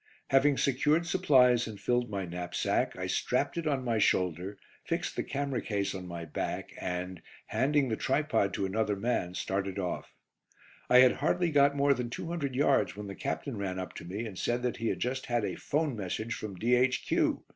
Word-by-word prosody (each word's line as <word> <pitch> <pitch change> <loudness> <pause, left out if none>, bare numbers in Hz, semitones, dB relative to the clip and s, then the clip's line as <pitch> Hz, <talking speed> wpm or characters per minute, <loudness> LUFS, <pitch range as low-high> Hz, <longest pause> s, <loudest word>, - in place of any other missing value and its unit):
Having 135 +1 +4
secured 150 +5 +2
supplies 130 -10 +4
and 105 -3 -8
filled 120 -1 0
my 100 -2 -3
knapsack, 90 0 -1
I - - -3
strapped - - 0
it 170 -2 -2
on 140 -3 0
my 115 -3 0
shoulder, 90 0 +1 0.3
fixed - - -2
the - - 0
camera 140 -3 -2
case 100 -2 -1
on 95 -1 -6
my 85 -1 -6
back 75 - -4
and, 90 -1 -4 0.2
handing 135 +5 +2
the 110 - 0
tripod 135 -6 +1
to 100 - -1
another 105 +2 0
man, 100 -4 -1
started 95 0 -2
off. 90 -3 -4 0.7
I 125 - +7
had 130 -1 +7
hardly 175 -2 +1
got 140 -1 +4
more 140 0 +4
than 125 -2 -3
two 120 - -5
hundred 145 -7 -2
yards 140 -4 +2
when 105 0 -6
the 100 - -6
Captain 120 +5 -4
ran 95 -2 -3
up 95 -1 -5
to - - -8
me 100 +7 -4
and 100 -5 -7
said 120 +1 0
that 125 -2 -1
he 115 - -2
had - - -1
just 130 +2 -2
had 120 -3 +1
a - - -2
'phone 150 -3 -1
message 110 +3 -3
from 105 -2 -6
D.H. 125 +5 +2
115 Hz, 195 wpm, -30 LUFS, 100-135 Hz, 0.7 s, I